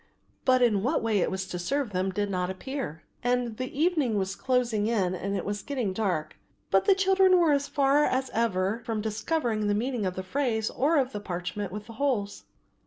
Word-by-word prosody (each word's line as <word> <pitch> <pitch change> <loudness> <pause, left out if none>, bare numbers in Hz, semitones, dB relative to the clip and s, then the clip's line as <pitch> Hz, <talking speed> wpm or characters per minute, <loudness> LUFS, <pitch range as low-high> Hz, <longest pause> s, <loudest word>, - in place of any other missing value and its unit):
But 255 -1 +4
in 215 -5 +3
what 255 +6 0
way 220 -3 +2
it - - +1
was 190 0 -3
to 180 - -5
serve 270 +6 -1
them 185 0 0
did 205 +2 -1
not 180 -1 -1
appear, 190 - -5 0.2
and 245 -2 0
the 255 +2 -5
evening 305 - +2
was 190 0 -1
closing 245 -5 +1
in 195 -6 +1
and 195 +2 -2
it - - -4
was 205 0 -3
getting 250 -9 -2
dark, 180 -7 -2 0.3
but 195 0 +4
the 395 - +5
children 385 -1 +4
were 335 -3 +4
as 280 -1 +1
far 285 0 +3
as 260 0 -1
ever 215 -1 0
from 225 -3 -2
discovering 220 0 -1
the 205 - +2
meaning 235 -2 -1
of 185 - -3
the 185 - -4
phrase 220 0 -1
or 300 +5 +2
of 265 -2 +1
the 210 - -4
parchment 185 +1 -4
with 210 +1 -6
the 230 - -10
holes. 220 -8 -1
225 Hz, 210 wpm, -27 LUFS, 195-270 Hz, 0.3 s, the